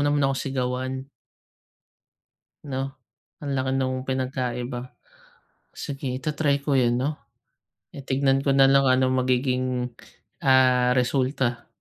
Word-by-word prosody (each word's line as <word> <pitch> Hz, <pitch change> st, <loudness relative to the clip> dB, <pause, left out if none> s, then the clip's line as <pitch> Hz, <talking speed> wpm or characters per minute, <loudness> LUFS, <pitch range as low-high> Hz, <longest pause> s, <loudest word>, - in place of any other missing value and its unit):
naman 145 Hz, -1 st, +2 dB
ako 135 Hz, -, 0 dB
sigawan?" 130 Hz, 0 st, -3 dB, 1.6 s
'No? 135 Hz, 0 st, -4 dB, 0.5 s
Ang 140 Hz, -, -2 dB
laki 130 Hz, 0 st, 0 dB
nung 130 Hz, -1 st, 0 dB
pinagkaiba. 125 Hz, -1 st, -3 dB, 0.9 s
Sige, 140 Hz, -2 st, -5 dB
ita-try 140 Hz, 0 st, 0 dB
ko 140 Hz, -, 0 dB
yun 120 Hz, -1 st, +2 dB
'no? 140 Hz, +4 st, 0 dB, 0.8 s
Eh, 140 Hz, -1 st, -10 dB
tignan 135 Hz, 0 st, +2 dB
ko 135 Hz, -, +3 dB
na 135 Hz, 0 st, +6 dB
lang 135 Hz, 0 st, +4 dB
ano 130 Hz, 0 st, +3 dB
magiging, 125 Hz, -1 st, 0 dB, 0.6 s
ah, 125 Hz, -1 st, +5 dB
resulta 125 Hz, -1 st, 0 dB
130 Hz, 110 wpm, -25 LUFS, 125-135 Hz, 1.6 s, na